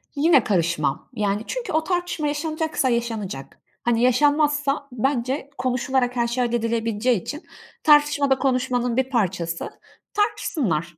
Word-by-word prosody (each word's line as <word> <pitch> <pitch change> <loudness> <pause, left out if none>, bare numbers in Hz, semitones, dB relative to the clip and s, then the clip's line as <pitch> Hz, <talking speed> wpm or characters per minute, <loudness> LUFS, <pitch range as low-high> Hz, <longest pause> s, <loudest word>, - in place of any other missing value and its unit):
yine 290 -3 +4
karışmam, 170 -7 0
yani 205 0 -1
çünkü - - -4
o 315 0 +2
tartışma 350 -4 -1
yaşanacaksa 310 -2 -1
yaşanacak. 220 - -3 0.3
Hani 240 -1 +1
yaşanmazsa 290 +2 +2
bence 265 +3 -1
konuşularak 255 0 0
her 235 -1 +1
şey 245 +1 0
halledilebileceği 230 -2 0
için 300 - -7 0.4
tartışma 295 -2 +4
da 265 - +5
konuşmanın 250 -2 0
bir 260 0 +1
parçası. 180 -8 -1 0.4
Tartışsınlar, 200 - -1
255 Hz, 120 wpm, -23 LUFS, 225-295 Hz, 0.4 s, da